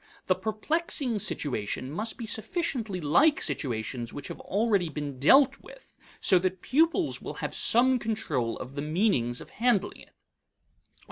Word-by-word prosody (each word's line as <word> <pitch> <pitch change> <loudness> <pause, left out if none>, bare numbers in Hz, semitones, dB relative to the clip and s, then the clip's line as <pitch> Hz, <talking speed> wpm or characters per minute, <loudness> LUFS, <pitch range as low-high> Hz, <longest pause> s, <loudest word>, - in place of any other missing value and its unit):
The 185 - +3
perplexing 230 - -1
situation 130 - -3
must 215 +9 -3
be 235 - -5
sufficiently 225 - -2
like 230 - +3
situations 120 -2 -3
which 145 - -8
have - - -7
already 200 -4 0
been 145 -3 -5
dealt 270 - +5
with - - -16 0.3
so 185 - +4
that 185 0 -2
pupils 325 +5 +1
will - - -6
have - - -4
some 255 +2 +4
control 155 - -2
of 130 +2 -8
the 140 - -4
meanings 150 - 0
of - - -12
handling 215 -3 0
it. - - -18
200 Hz, 145 wpm, -28 LUFS, -, 0.3 s, dealt